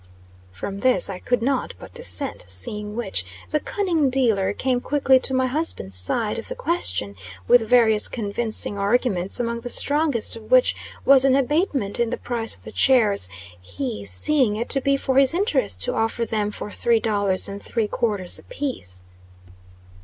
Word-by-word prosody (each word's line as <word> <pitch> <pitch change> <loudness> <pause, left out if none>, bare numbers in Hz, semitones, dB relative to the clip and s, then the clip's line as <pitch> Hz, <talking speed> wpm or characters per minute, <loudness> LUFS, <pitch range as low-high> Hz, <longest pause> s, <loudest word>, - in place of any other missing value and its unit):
From 195 - -7
this 255 -3 +3
I 185 - -7
could 245 +2 -1
not 265 +1 -2
but - - -13
dissent, 475 - -3
seeing 210 - -4
which, 225 -5 -1 0.3
the 305 - +1
cunning 335 -6 -1
dealer 225 -7 +1
came 250 +3 -1
quickly 270 -2 +2
to 265 - +1
my 260 0 +1
husband's 255 - -2
side 90 0 0
of - - -9
the - - -6
question 95 +3 -1 0.3
with 225 -3 +4
various 220 -4 +4
convincing 215 -2 -2
arguments, 200 -2 0
among 235 -1 -2
the 245 +1 -7
strongest 285 -5 +2
of 225 - -12
which - - +4 0.3
was 270 -1 +6
an 270 -1 +4
abatement 275 - -1
in 235 -1 +1
the - - -3
price 230 -2 -1
of - - -21
the - - -10
chairs 215 - +4 0.3
he 240 - -6
seeing 210 - +1
it 235 +3 -4
to 270 - +2
be 275 +1 +1
for 270 0 +1
his 275 +3 +6
interest 415 +7 0
to - - -2
offer 225 +1 -1
them 210 -2 -2
for 210 0 -7
three 235 +1 +1
dollars 205 -4 0
and 200 0 -8
three 225 -3 -2
quarters 205 -5 0
a - - -16
piece. 170 - -3
235 Hz, 175 wpm, -22 LUFS, 205-270 Hz, 0.3 s, was